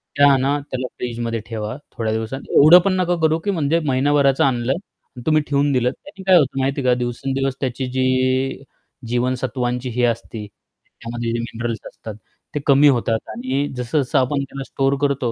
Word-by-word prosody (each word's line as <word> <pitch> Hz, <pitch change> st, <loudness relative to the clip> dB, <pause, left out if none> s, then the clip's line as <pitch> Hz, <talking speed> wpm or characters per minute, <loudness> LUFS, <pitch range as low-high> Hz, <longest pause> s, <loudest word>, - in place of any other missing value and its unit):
त्या 145 Hz, 0 st, +6 dB
आणा, 135 Hz, +2 st, +1 dB
त्याला 130 Hz, -1 st, -2 dB
फ्रिजमध्ये 115 Hz, -1 st, -3 dB
ठेवा 110 Hz, -1 st, -4 dB, 0.2 s
थोड्या 110 Hz, -1 st, -1 dB
दिवसात. 110 Hz, +4 st, -3 dB, 0.2 s
एवढं 155 Hz, +5 st, +9 dB
पण 195 Hz, -, +2 dB
नको 175 Hz, -1 st, +1 dB
करू 160 Hz, +1 st, +2 dB
की 200 Hz, -, +2 dB
म्हणजे 165 Hz, -2 st, +1 dB
महिनाभराचं 140 Hz, 0 st, +3 dB
आणलं 125 Hz, -2 st, +1 dB
आणि 155 Hz, -7 st, -12 dB
तुम्ही 155 Hz, -1 st, +3 dB
ठेवून 145 Hz, 0 st, +1 dB
दिलं. 125 Hz, -2 st, +2 dB
त्याने 245 Hz, -, -13 dB
काय 185 Hz, -1 st, +7 dB
होतं 135 Hz, -4 st, +1 dB
माहिती 135 Hz, +1 st, 0 dB
आहे 130 Hz, -, -2 dB
का? -, -, +5 dB
दिवसेंदिवस 135 Hz, +2 st, -2 dB
त्याची 130 Hz, -1 st, -2 dB
जी 130 Hz, +1 st, 0 dB, 0.4 s
जीवनसत्वांची 125 Hz, +1 st, -1 dB
ही 125 Hz, +1 st, -1 dB
असते, 115 Hz, -2 st, -3 dB, 0.6 s
त्यामध्ये 115 Hz, 0 st, -4 dB
जे 120 Hz, -, -1 dB
मिनरल्स 115 Hz, 0 st, -4 dB
असतात, 110 Hz, -2 st, -9 dB, 0.4 s
ते 150 Hz, -, +1 dB
कमी 140 Hz, +1 st, +6 dB
होतात 115 Hz, -4 st, +1 dB
आणि 130 Hz, +5 st, -2 dB
जसं-जसं 125 Hz, +2 st, 0 dB
आपण 140 Hz, +2 st, 0 dB
त्याला 135 Hz, 0 st, -7 dB
स्टोअर 135 Hz, +1 st, 0 dB
करतो, 140 Hz, -4 st, 0 dB
130 Hz, 170 wpm, -20 LUFS, 120-140 Hz, 0.6 s, एवढं